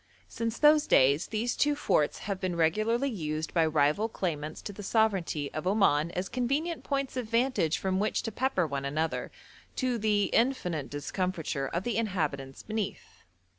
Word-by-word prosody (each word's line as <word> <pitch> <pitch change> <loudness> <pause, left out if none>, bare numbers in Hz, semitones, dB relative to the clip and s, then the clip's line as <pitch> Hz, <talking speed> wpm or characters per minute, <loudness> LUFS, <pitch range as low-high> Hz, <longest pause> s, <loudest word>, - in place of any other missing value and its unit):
Since 230 0 -3
those 300 0 +5
days 140 +4 +4
these 230 +3 -1
two 295 0 +2
forts 150 - +1
have 200 -2 -2
been 185 -2 -1
regularly 215 +11 +2
used 155 -5 -3
by 165 -2 +3
rival 155 +8 +2
claimants 155 -7 -3
to 205 - -6
the 205 - -8
sovereignty 195 -9 0
of 155 +3 -3
Oman 185 -6 +3
as 180 +1 -2
convenient 280 - -1
points 275 -2 -2
of 250 -3 -2
vantage 230 - +1
from 190 0 -1
which 210 +2 0
to 225 - -3
pepper 240 -6 0
one 140 -2 -3
another, 155 +4 -2 0.5
to 250 -3 0
the 210 -1 +2
infinite 180 - +1
discomfiture 150 -1 -2
of 170 +5 -3
the 240 0 -1
inhabitants 150 -11 -2
beneath. 215 -2 -5
190 Hz, 165 wpm, -29 LUFS, 155-230 Hz, 0.5 s, those